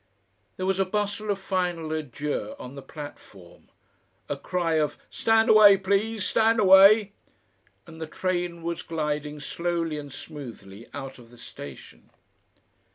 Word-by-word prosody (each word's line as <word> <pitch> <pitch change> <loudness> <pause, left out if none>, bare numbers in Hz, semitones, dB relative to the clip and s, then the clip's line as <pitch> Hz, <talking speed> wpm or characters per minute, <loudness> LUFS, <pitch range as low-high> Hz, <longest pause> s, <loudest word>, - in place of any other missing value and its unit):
There 185 - -3
was 190 0 0
a - - +4
bustle 205 +2 -2
of 200 - +1
final 180 -4 -2
adieux 150 - -4
on 125 - -9
the 140 - -8
platform, 105 - -12 0.6
a - - -2
cry 170 -3 -1
of 150 -1 -1
"Stand 225 0 +3
away, 210 -2 +8
please, 200 +2 0
stand 225 +3 +3
away!" 200 +1 +7 0.7
and 165 -2 -12
the 160 - -4
train 175 0 -3
was 170 0 -3
gliding 150 -2 -3
slowly 165 0 -2
and 145 -1 -9
smoothly 115 -9 -10
out 135 -2 -8
of 120 -1 -16
the 120 - -17
station. 70 - -11
170 Hz, 140 wpm, -26 LUFS, 150-195 Hz, 0.7 s, away